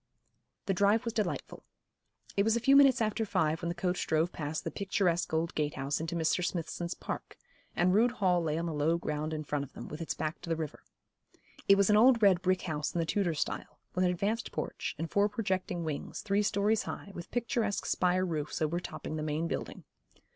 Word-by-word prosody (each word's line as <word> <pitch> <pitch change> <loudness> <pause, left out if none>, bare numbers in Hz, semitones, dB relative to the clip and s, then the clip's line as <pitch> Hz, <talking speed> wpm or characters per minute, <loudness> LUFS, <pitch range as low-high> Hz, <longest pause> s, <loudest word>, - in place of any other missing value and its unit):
The 195 - +1
drive 205 +5 +3
was 230 - -2
delightful. 215 -2 -3 0.7
It 200 - +3
was 225 +2 +3
a - - +2
few 270 +4 +5
minutes 270 -4 +6
after 215 +1 0
five 160 -6 0
when 170 - -2
the 170 - -3
coach 180 +1 -1
drove 160 +2 +2
past 155 0 -4
the - - -3
picturesque 190 -3 0
old 160 +2 0
gate 150 -1 -1
house 135 +2 -1
into 165 +1 -3
Mr. 170 +2 +1
Smithson's 175 0 -3
Park, - - -6 0.4
and 180 +1 +3
Rood 235 +4 +4
Hall 185 -6 +2
lay 155 -1 -1
on 170 - -1
the 165 - -2
low 155 +3 +2
ground 155 -1 -3
in 155 -1 -3
front 145 -1 -2
of 140 - -11
them, - - -8
with 150 +3 -7
its 165 - -3
back 155 +1 -3
to - - -8
the 165 - +2
river. 155 -2 -5 0.9
It 195 - +8
was 200 +1 +4
an 210 - +6
old 240 +2 +6
red 190 -3 +5
brick 185 0 +1
house 150 -3 -2
in - - +1
the 165 - +1
Tudor 175 -1 0
style, 150 - -3 0.2
with 180 - +1
an 180 - +4
advanced 205 +6 -1
porch, - - -4
and 165 - -3
four 200 +4 +2
projecting 190 -5 -2
wings, 155 -3 -4
three 200 0 +1
stories 205 +2 +2
high, 200 - -6
with 175 -2 -8
picturesque 230 -3 -1
spire 185 +1 +2
roofs 155 -4 -3
overtopping 155 0 -3
the - - -3
main 155 +2 -1
building. - - -5
175 Hz, 215 wpm, -31 LUFS, 160-200 Hz, 0.9 s, It